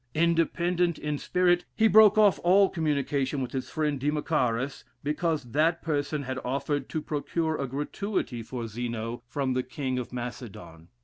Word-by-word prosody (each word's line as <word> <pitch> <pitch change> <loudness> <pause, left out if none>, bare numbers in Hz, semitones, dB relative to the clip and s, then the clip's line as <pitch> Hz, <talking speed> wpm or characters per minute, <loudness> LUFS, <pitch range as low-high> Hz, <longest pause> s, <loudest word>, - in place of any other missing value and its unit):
Independent 170 +1 +1
in 150 -1 -3
spirit, 180 -1 +2
he 225 0 +4
broke 215 0 +7
off 205 -5 +5
all 195 +3 +5
communication 145 -3 -1
with 125 -2 -3
his 130 -1 -4
friend 150 -3 -1
Democharis, 140 -3 -1 0.2
because 150 -3 -1
that 160 +5 +2
person 150 -1 -1
had 130 0 -4
offered 140 +2 -2
to 155 - -3
procure 160 +2 -1
a 140 -2 -2
gratuity 145 - -3
for 120 +1 -5
Zeno 115 +1 -4
from 135 0 -1
the 130 - +1
King 130 0 -3
of 125 - -6
Macedon. 120 -9 -7
145 Hz, 150 wpm, -27 LUFS, 130-165 Hz, 0.2 s, broke